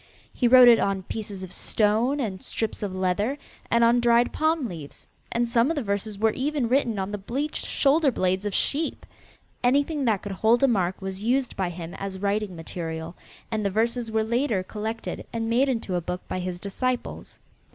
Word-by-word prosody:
He 245 - +2
wrote 250 0 +9
it 235 -2 +8
on 195 -1 0
pieces 200 -2 -5
of 185 - -8
stone 225 +7 +2
and 200 -8 -3
strips 225 - -3
of 200 -3 -3
leather, 190 +8 0 0.3
and 235 0 +4
on 235 +1 +5
dried 235 0 +3
palm 315 -2 +1
leaves, 160 -7 -9 0.2
and 235 0 +1
some 235 +3 +3
of 330 - 0
the 285 - -2
verses 200 0 -2
were 220 +2 +3
even 280 0 -1
written 245 -3 +1
on 190 +1 -2
the 205 - -4
bleached 270 +10 -3
shoulder 290 +1 +3
blades 185 -3 0
of 205 -2 -2
sheep. 305 +3 -1 0.6
Anything 280 +3 +2
that 215 -5 +1
could 205 - -5
hold 225 +6 +2
a - - +7
mark 190 -5 0
was 190 0 -5
used 250 +3 0
by 190 -2 -1
him 170 -1 -7
as 195 -1 -4
writing 200 0 -1
material, 165 0 -6 0.4
and 215 -1 -1
the 200 - +1
verses 230 +3 0
were 220 0 +1
later 230 -3 0
collected 220 +3 -5
and 225 0 -2
made 260 +4 +3
into 230 -7 -2
a 175 - 0
book 180 +2 -5
by 185 - -3
his 180 -1 -4
disciples. 245 +6 -3
220 Hz, 195 wpm, -25 LUFS, 190-245 Hz, 0.6 s, wrote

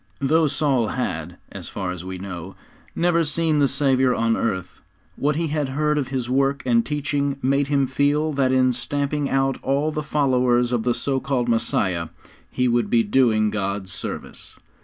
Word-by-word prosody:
Though 155 +3 +3
Saul 135 -5 +1
had, 90 -9 -3
as - - -8
far 95 -3 -4
as 90 -1 -6
we 95 0 -6
know, 95 -1 -7 0.4
never 170 -1 +2
seen 155 0 +1
the 140 - +4
Saviour 135 -2 +2
on 115 0 +1
earth, 95 -6 -3 0.3
what 150 +1 0
he 165 0 -1
had 150 -2 -1
heard 150 +2 0
of 135 - -2
His 130 -2 -3
work 135 +2 +1
and 115 -2 +3
teaching 145 -1 -1
made 140 +2 +2
him 140 -1 +2
feel 145 +4 +1
that 135 -2 +1
in 130 -1 +3
stamping 140 +3 -2
out 135 0 +1
all 140 +3 0
the 150 - -3
followers 125 -4 +2
of 120 -2 +1
the 120 +1 +1
so 135 -1 0
called 130 -3 -1
Messiah, 100 -7 0 0.4
he 125 0 0
would 120 0 +1
be 115 -1 +3
doing 110 -2 +2
God 100 -1 -2
service. 95 - -6
130 Hz, 180 wpm, -22 LUFS, 115-145 Hz, 0.4 s, the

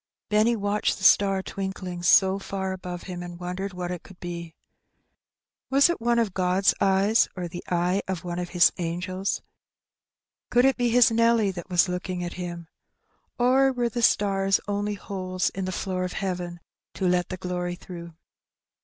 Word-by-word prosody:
Benny 215 +3 +3
watched 205 0 0
the 190 - -10
star 195 0 +5
twinkling 190 -3 -5
so 190 +3 +5
far 190 -1 -4
above 180 -2 -6
him, 180 -2 -6
and 175 -1 -8
wondered 180 +2 -4
what 180 -1 -5
it 180 -2 -5
could 190 0 -16
be. 170 -2 -7 1.1
Was 280 +5 +5
it 345 - -5
one 235 0 +2
of 225 -5 +1
Qod^s 185 +1 +2
eyes, 195 +3 +3
or 180 -2 -4
the 175 +1 -8
eye 180 +2 +1
of 190 -3 -3
one 175 0 -4
of 175 -1 -4
His 175 -1 +5
angels? 185 +3 -2 1.1
Could 245 +1 +4
it 270 -1 +4
be 245 -1 +1
his 240 0 +5
Nelly 230 -2 +3
that 180 0 -8
was 180 0 +4
looking 180 0 -3
at 175 - -4
him? 175 -2 -6 0.7
Or 260 +2 +4
were 245 -2 0
the 240 +1 -3
stars 195 -3 +3
only 205 0 -1
holes 185 -2 -3
in 190 0 -4
the 185 - -3
floor 185 0 -2
of 180 - -3
heaven 180 -3 -4 0.3
to 190 - 0
let 180 0 +1
the 185 - -4
glory 180 0 -3
through? 170 -2 -10
185 Hz, 175 wpm, -26 LUFS, 180-205 Hz, 1.1 s, star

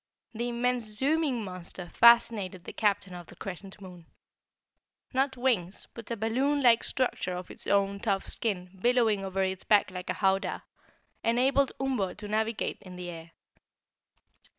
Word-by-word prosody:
The 235 +2 -2
immense 245 0 0
zooming 265 +3 0
monster 180 -1 -7
fascinated 225 -6 +4
the - - -8
Captain 205 -3 0
of 175 -1 -9
the - - -14
Crescent 195 +1 -8
Moon. 180 -4 -12 1.1
Not 265 0 +1
wings, 215 -8 0
but 230 -2 -10
a 235 - -2
balloon 265 +7 +1
like 235 -2 +6
structure 245 -8 -1
of 180 0 -7
its - - -6
own 200 0 +2
tough 200 -3 0
skin 190 -4 -3
billowing 230 -4 +3
over 195 0 -1
its 190 0 -2
back 205 -2 +3
like 180 -1 -7
a - - +1
howdah, 190 0 0 0.6
enabled 260 +4 +2
Umbo 255 -9 -1
to 210 0 -7
navigate 220 +1 -1
in 185 -2 -11
the 180 -1 -6
air. 165 0 -10
210 Hz, 150 wpm, -29 LUFS, 185-240 Hz, 1.1 s, like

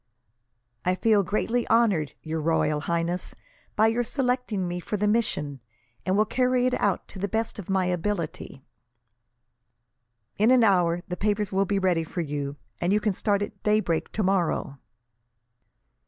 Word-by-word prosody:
"I 180 +1 +1
feel 215 +1 +3
greatly 225 +5 -1
honoured, 200 - +3
Your 160 0 -3
Royal 155 -1 +1
Highness, 170 +2 -2 0.4
by 215 - +4
your 225 +2 +2
selecting 250 -6 -1
me 175 0 -3
for 210 +4 -3
the 210 +1 +1
mission, 150 -11 0 0.5
and 190 +1 +2
will 215 - +4
carry 250 +1 +1
it 255 - +1
out 200 -2 0
to 190 - -9
the 200 - -1
best 220 +1 -2
of 195 - -8
my 190 -1 +2
ability." 175 -6 -3 1.8
"In 215 +3 +4
an 255 -2 +6
hour 175 -4 +3
the 180 - -3
papers 210 -1 0
will 195 +1 +2
be 200 +1 0
ready 180 -4 +2
for 175 +3 -4
you, 145 -2 -3 0.2
and 175 - 0
you 210 - +4
can 210 -1 0
start 205 +1 0
at - - -8
daybreak 210 -6 +1
tomorrow." 185 -8 0
195 Hz, 155 wpm, -26 LUFS, 170-215 Hz, 1.8 s, an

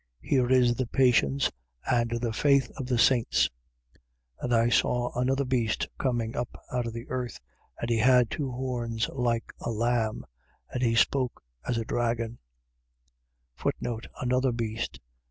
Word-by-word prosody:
Here 125 -3 +2
is 125 -2 +5
the 125 0 -2
patience 115 - +3 0.4
and 115 -1 +2
the 115 -1 -2
faith 140 0 +3
of 130 - -5
the 125 -2 +1
saints. 120 0 +3 0.9
13:11. - - -12
And 120 -1 +2
I 115 +1 +4
saw 120 0 +2
another 135 +3 +1
beast 120 -4 0
coming 120 -3 -1
up 120 0 -4
out 125 -1 -1
of 115 - -5
the 115 0 -7
earth: 125 -1 -3 0.4
and - - -2
he 115 - +2
had 125 0 +5
two 140 -3 -2
horns, 120 -3 -2
like 120 -3 -1
a - - -4
lamb: 115 -1 0 0.5
and 125 - -2
he 115 -2 +2
spoke 125 - +1 0.2
as 120 - 0
a 115 - -2
dragon. 115 -1 -1 1.8
Another 125 +1 +1
beast. 115 -8 -3
120 Hz, 150 wpm, -28 LUFS, 115-125 Hz, 1.8 s, is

